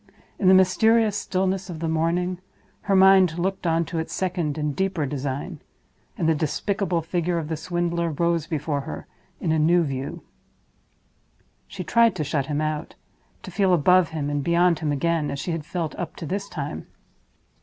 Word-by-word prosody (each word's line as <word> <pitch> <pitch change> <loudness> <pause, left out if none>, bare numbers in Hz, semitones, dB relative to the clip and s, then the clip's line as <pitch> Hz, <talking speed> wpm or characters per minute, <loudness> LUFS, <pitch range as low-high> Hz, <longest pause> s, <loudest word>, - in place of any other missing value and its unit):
In 190 - +2
the 190 - +8
mysterious 215 +3 +4
stillness 190 -1 -1
of 170 - -5
the 165 - -2
morning, 170 +3 0 0.5
her 195 - +4
mind 190 -3 +6
looked 185 0 -2
on 165 0 +2
to 165 - -3
its 160 - -4
second 175 -5 -1
and 150 -1 -1
its - - -9
deeper 190 -5 0
design, 140 +4 -4 0.6
and 160 - 0
the 160 - +4
despicable 170 +4 -1
figure 175 +1 -1
of 160 -2 -3
the 160 - -1
swindler 170 +1 -1
rose 170 +1 0
before 150 -3 -2
her - - -7 0.3
in 160 - -1
a 160 - +2
new 170 +3 +4
view. 135 -2 -4 1.4
She 190 -2 -6
tried 230 +1 +3
to 160 - -2
shut 140 -1 -1
him 150 0 -1
out—to 155 0 -7
feel 190 -3 +3
above 180 +2 +4
him 155 -3 -3
and 145 -1 -1
beyond 170 +1 +3
him 155 -2 -1
again, 155 +1 0
as 140 - -3
she 175 - -3
had 165 -2 -4
felt 170 -4 -3
up 175 - -5
to - - -7
this 200 +5 -3
time. 140 - -5
170 Hz, 180 wpm, -24 LUFS, 155-185 Hz, 1.4 s, the